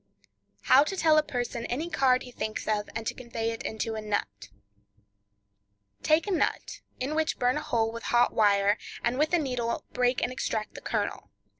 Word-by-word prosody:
How 275 Hz, -, +6 dB
to 385 Hz, -, -4 dB
Tell 315 Hz, -3 st, +5 dB
a -, -, +4 dB
Person 245 Hz, -4 st, -4 dB
Any 290 Hz, +8 st, -2 dB
Card 260 Hz, -6 st, +2 dB
He 250 Hz, -, -10 dB
Thinks 215 Hz, -2 st, -4 dB
of, 210 Hz, -1 st, 0 dB
and 225 Hz, -, -4 dB
to -, -, -1 dB
Convey 230 Hz, -2 st, -3 dB
It 225 Hz, -, -6 dB
into 220 Hz, +1 st, -3 dB
a 220 Hz, -, -4 dB
Nut.—Take 100 Hz, -, -5 dB
a 410 Hz, -, -3 dB
nut, 360 Hz, -, -1 dB, 0.2 s
in 270 Hz, +4 st, -2 dB
which 315 Hz, 0 st, 0 dB
burn 250 Hz, 0 st, +2 dB
a -, -, -2 dB
hole 225 Hz, -1 st, 0 dB
with 230 Hz, 0 st, -7 dB
a -, -, -3 dB
hot 240 Hz, 0 st, +3 dB
wire, 205 Hz, -1 st, +3 dB, 0.2 s
and 245 Hz, +3 st, 0 dB
with 305 Hz, +1 st, +2 dB
a 350 Hz, -, +4 dB
needle 250 Hz, -6 st, -2 dB
break 250 Hz, 0 st, +1 dB
and -, -, 0 dB
extract 220 Hz, -4 st, -3 dB
the -, -, -9 dB
kernel. -, -, -3 dB
230 Hz, 190 wpm, -28 LUFS, 200-255 Hz, 0.2 s, How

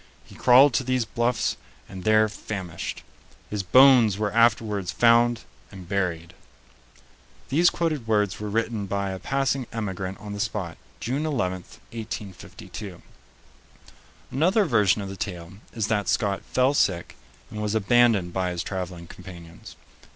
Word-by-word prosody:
He -, -, -17 dB
crawled 130 Hz, +2 st, +6 dB
to 130 Hz, -, +1 dB
these 130 Hz, -2 st, 0 dB
Bluffs 120 Hz, +1 st, -1 dB, 0.3 s
and 95 Hz, -1 st, -9 dB
there 110 Hz, 0 st, +4 dB
famished. 95 Hz, -5 st, -6 dB, 0.5 s
His 105 Hz, -1 st, -1 dB
bones 120 Hz, 0 st, +6 dB
were 105 Hz, -1 st, -2 dB
afterwards 110 Hz, -5 st, +2 dB
found 120 Hz, +1 st, +4 dB, 0.3 s
and 95 Hz, -3 st, -11 dB
buried." 90 Hz, -3 st, -2 dB, 1.2 s
These 170 Hz, +5 st, +4 dB
quoted 155 Hz, -8 st, -2 dB
words 105 Hz, -3 st, +1 dB
were 105 Hz, 0 st, -4 dB
written 110 Hz, -1 st, -2 dB
by 100 Hz, 0 st, -2 dB
a 95 Hz, -, -6 dB
passing 135 Hz, 0 st, -1 dB
emigrant 95 Hz, -4 st, -4 dB
on 105 Hz, 0 st, -8 dB
the 105 Hz, -, -6 dB
spot, 90 Hz, -6 st, -3 dB, 0.2 s
June 135 Hz, +6 st, -2 dB
11, 95 Hz, -, -2 dB, 0.3 s
1852. 105 Hz, -3 st, -8 dB, 1.3 s
Another 185 Hz, -, +2 dB
version 105 Hz, -, +2 dB
of 95 Hz, -, -6 dB
the 95 Hz, -, -7 dB
tale 90 Hz, -3 st, -6 dB, 0.2 s
is 110 Hz, -3 st, -1 dB
that 105 Hz, -2 st, -1 dB
Scott 105 Hz, -4 st, 0 dB
fell 130 Hz, +2 st, +3 dB
sick 90 Hz, -10 st, 0 dB, 0.4 s
and 105 Hz, -, -5 dB
was 105 Hz, 0 st, -1 dB
abandoned 110 Hz, -4 st, +3 dB
by 95 Hz, -1 st, -1 dB
his 90 Hz, 0 st, -3 dB
traveling 90 Hz, -3 st, -5 dB
companions. 85 Hz, -2 st, -12 dB
105 Hz, 140 wpm, -25 LUFS, 95-120 Hz, 1.3 s, crawled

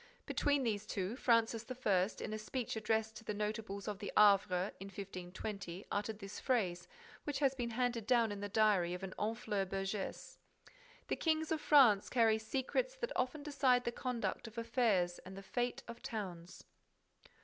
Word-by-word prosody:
Between 285 Hz, -2 st, +1 dB
these 210 Hz, -3 st, -1 dB
two, 195 Hz, +2 st, -2 dB
Francis 230 Hz, -3 st, +2 dB
I., 205 Hz, -7 st, +2 dB
in -, -, -4 dB
a 215 Hz, -, -3 dB
speech 235 Hz, +3 st, -3 dB
addressed 220 Hz, 0 st, 0 dB
to -, -, -11 dB
the 210 Hz, -, -3 dB
notables 210 Hz, -1 st, -3 dB
of 205 Hz, -2 st, -3 dB
the 205 Hz, -, -5 dB
Havre, 200 Hz, -2 st, +5 dB
in 195 Hz, -, -7 dB
1520, 195 Hz, 0 st, -6 dB
uttered 210 Hz, +1 st, -1 dB
this 195 Hz, -1 st, -7 dB
phrase, 180 Hz, -8 st, 0 dB, 0.4 s
which 290 Hz, -2 st, -2 dB
has 270 Hz, -2 st, +3 dB
been 245 Hz, -3 st, -3 dB
handed 235 Hz, -2 st, -1 dB
down 235 Hz, -3 st, +4 dB
in 205 Hz, -, -5 dB
the 205 Hz, 0 st, -4 dB
diary 200 Hz, -5 st, +3 dB
of 180 Hz, -, -8 dB
a 190 Hz, -, -3 dB
Honfleur 210 Hz, 0 st, -2 dB
burgess; 195 Hz, +1 st, -4 dB, 0.7 s
"The -, -, 0 dB
Kings 315 Hz, -1 st, 0 dB
of 315 Hz, -1 st, 0 dB
France 245 Hz, -9 st, +6 dB
carry 225 Hz, -3 st, +4 dB
secrets 270 Hz, -, -1 dB
that -, -, -4 dB
often 260 Hz, +4 st, -1 dB
decide 270 Hz, -4 st, +3 dB
the 235 Hz, -, -1 dB
conduct 245 Hz, -1 st, -3 dB
of 225 Hz, +1 st, -12 dB
affairs 230 Hz, -7 st, +1 dB
and 190 Hz, +1 st, -10 dB
the 195 Hz, -, -8 dB
fate 245 Hz, +5 st, -2 dB
of 235 Hz, 0 st, -8 dB
towns." 195 Hz, -9 st, -6 dB
220 Hz, 170 wpm, -36 LUFS, 195-245 Hz, 0.7 s, France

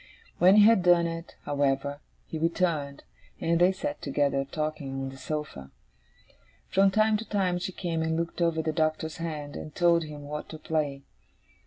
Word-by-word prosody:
When 185 Hz, +3 st, +7 dB
he 210 Hz, -, +8 dB
had 225 Hz, -3 st, +6 dB
done 175 Hz, -1 st, +5 dB
it, 165 Hz, 0 st, -5 dB
however, 140 Hz, 0 st, 0 dB, 0.3 s
he 160 Hz, -, -5 dB
returned, 160 Hz, -4 st, -1 dB, 0.4 s
and 170 Hz, +1 st, +1 dB
they 180 Hz, +2 st, +6 dB
sat 290 Hz, +10 st, -4 dB
together, 140 Hz, -1 st, 0 dB
talking, 150 Hz, -1 st, -4 dB
on 135 Hz, 0 st, -3 dB
the 135 Hz, -, -11 dB
sofa. 130 Hz, -, -5 dB, 1.0 s
From 195 Hz, +1 st, +4 dB
time 215 Hz, +2 st, +3 dB
to 225 Hz, -, -8 dB
time 185 Hz, -4 st, +1 dB
she 185 Hz, -, -3 dB
came 170 Hz, -3 st, -3 dB
and 160 Hz, 0 st, 0 dB
looked 170 Hz, +1 st, -3 dB
over 165 Hz, -1 st, +1 dB
the 155 Hz, 0 st, -1 dB
Doctor's 155 Hz, 0 st, -1 dB
hand, 150 Hz, -3 st, -5 dB
and 155 Hz, -, -8 dB
told 170 Hz, -2 st, +3 dB
him 150 Hz, -1 st, -9 dB
what 150 Hz, +1 st, -6 dB
to 160 Hz, -, -7 dB
play. 150 Hz, -3 st, -2 dB
160 Hz, 175 wpm, -28 LUFS, 145-175 Hz, 1.0 s, he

